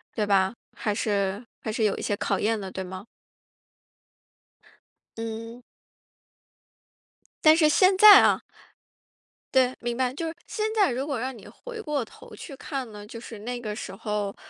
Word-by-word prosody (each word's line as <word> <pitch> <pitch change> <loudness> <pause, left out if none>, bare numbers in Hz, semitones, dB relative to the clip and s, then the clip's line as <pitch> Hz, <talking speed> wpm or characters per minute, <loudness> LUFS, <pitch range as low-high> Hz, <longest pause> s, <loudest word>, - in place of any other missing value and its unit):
对 215 - 0
吧？ 195 0 +3 0.2
还 210 - -1
是 205 0 -1 0.2
还 220 - -3
是 220 0 0
有 200 - +1
一 - - -5
些 - - -1
考 - - -1
验 220 +1 +1
的， 195 -2 -6
对 190 - -5
吗？ 185 +2 -8 2.1
嗯。 230 +2 -6 1.8
但 310 0 +8
是 315 -2 +4
现 370 +5 +4
在 420 +1 +11
啊 - - +3 1.1
对， 260 -1 +4
明 240 0 -3
白。 255 0 0
就 330 +4 -4
是 325 - -5
现 430 - -3
在 405 -10 +4
如 260 +4 -3
果 280 -4 -2
让 260 +1 -4
你 195 - -13
回 475 -3 -9
过 300 - -2
头 220 - -14
去 285 - -9
看 270 -4 -5
呢， 205 -1 -10
就 230 - -9
是 225 -2 -10
那 245 +3 -5
个 215 -3 -5
时 195 -3 -7
候， 210 -1 -3
230 Hz, 180 characters per minute, -26 LUFS, 210-275 Hz, 2.1 s, 在